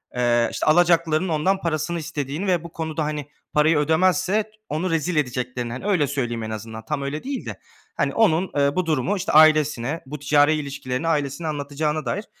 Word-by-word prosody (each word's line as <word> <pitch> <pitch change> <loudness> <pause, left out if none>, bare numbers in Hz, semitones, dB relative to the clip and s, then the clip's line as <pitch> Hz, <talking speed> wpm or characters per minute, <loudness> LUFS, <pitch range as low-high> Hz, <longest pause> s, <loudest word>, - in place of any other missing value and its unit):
eee, 120 -1 +2
işte, - - -3
alacaklıların 170 +1 +3
ondan 185 +5 +1
parasını 165 +1 -1
istediğini 150 +2 -4
ve 175 -3 +1
bu 170 - -9
konuda, 160 -1 -3
hani, 150 -1 -3 0.3
parayı 150 +1 +4
ödemezse 185 +6 +2
t 215 - -23 0.2
onu 165 +5 -1
rezil 165 +1 0
edeceklerini. 125 -3 -2
Hani, 130 - -7
öyle 175 -8 +2
söyleyeyim 120 -5 -2
en 110 - -5
azından. 110 0 -7
Tam 145 +3 -2
öyle 140 +2 -4
değil 275 0 -4
de. - - -7 0.4
Hani, - - 0
onun, 190 -5 +2
eee, 140 0 +2
bu 185 - 0
durumu, 160 +6 0
işte, 185 - -2
ailesine 155 -2 +4
bu 145 +3 -7
ticari 145 +2 +4
ilişkilerini 140 -1 -3
ailesine 150 0 -1
anlatacağına 150 +1 -2
dair, 205 - -2
155 Hz, 185 wpm, -23 LUFS, 140-170 Hz, 0.4 s, parayı